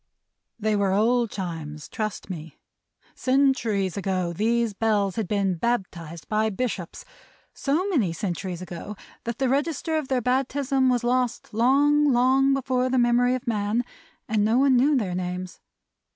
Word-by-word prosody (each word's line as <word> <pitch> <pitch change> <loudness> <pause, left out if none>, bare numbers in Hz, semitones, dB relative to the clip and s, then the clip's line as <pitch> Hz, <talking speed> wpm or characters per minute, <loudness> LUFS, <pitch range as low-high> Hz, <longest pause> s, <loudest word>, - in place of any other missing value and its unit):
They 215 0 +1
were 200 -2 +1
old 235 +3 +2
Chimes, 160 -6 -6
trust 215 -2 -4
me. 165 -4 -8 0.6
Centuries 255 -8 +1
ago, 185 -3 -1
these 230 +3 +1
Bells 205 -3 +1
had 220 -4 -2
been 200 -2 +1
baptized 170 -6 -3
by 215 0 +1
bishops: 210 - -4 0.5
so 310 +8 0
many 260 - +1
centuries 180 +1 -4
ago, 185 +4 -7 0.3
that 235 0 -3
the 265 - +1
register 310 +4 0
of 305 -4 -3
their 260 -1 +1
baptism 265 +1 +1
was 245 -1 +1
lost 245 -1 -1
long, 285 +5 +4
long 260 +2 +4
before 255 -1 0
the 260 - +1
memory 245 +1 +3
of 255 - -6
man, 220 +1 0 0.4
and 215 -1 +1
no 220 +3 +3
one 270 0 +4
knew 275 +4 +4
their 195 -7 -1
names. 180 0 -4
230 Hz, 150 wpm, -25 LUFS, 195-260 Hz, 0.6 s, long